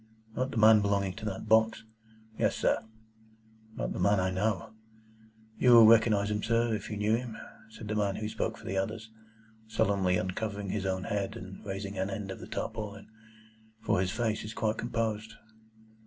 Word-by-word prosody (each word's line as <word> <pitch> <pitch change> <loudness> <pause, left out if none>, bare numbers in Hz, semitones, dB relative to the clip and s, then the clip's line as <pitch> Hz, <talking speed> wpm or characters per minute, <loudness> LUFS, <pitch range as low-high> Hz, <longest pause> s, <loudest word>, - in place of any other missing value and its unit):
"Not 130 +1 -1
the 115 - -5
man 110 0 +7
belonging 100 -2 0
to 110 - -7
that 100 -3 -4
box?" 110 0 +3 0.5
"Yes, - - +1
sir." - - +2 1.0
"Not - - -3
the - - -5
man 100 0 +3
I 95 0 0
know?" 100 +1 -1 0.9
"You 125 - +6
will 115 -1 +10
recognise 110 -2 +5
him, 105 0 -1
sir, 115 0 +1
if 105 - -4
you 105 - -4
knew 105 +2 +2
him," 120 -2 -5 0.3
said 110 0 -10
the 105 - -2
man 100 -2 0
who 110 - -3
spoke - - -3
for - - -14
the 95 - -2
others, 110 +3 -3 0.6
solemnly 95 -4 +1
uncovering 100 +2 -3
his 95 0 -2
own 95 -1 -1
head, 100 -1 -2
and 95 0 -10
raising 100 0 -5
an 95 +1 -1
end 100 -2 -5
of - - -7
the - - -9
tarpaulin, 110 -2 -5 0.7
"for 105 -5 +1
his 95 - 0
face 110 +1 -1
is 110 +1 -7
quite 110 0 -1
composed." 110 -2 -2
105 Hz, 185 wpm, -30 LUFS, 100-110 Hz, 1.0 s, will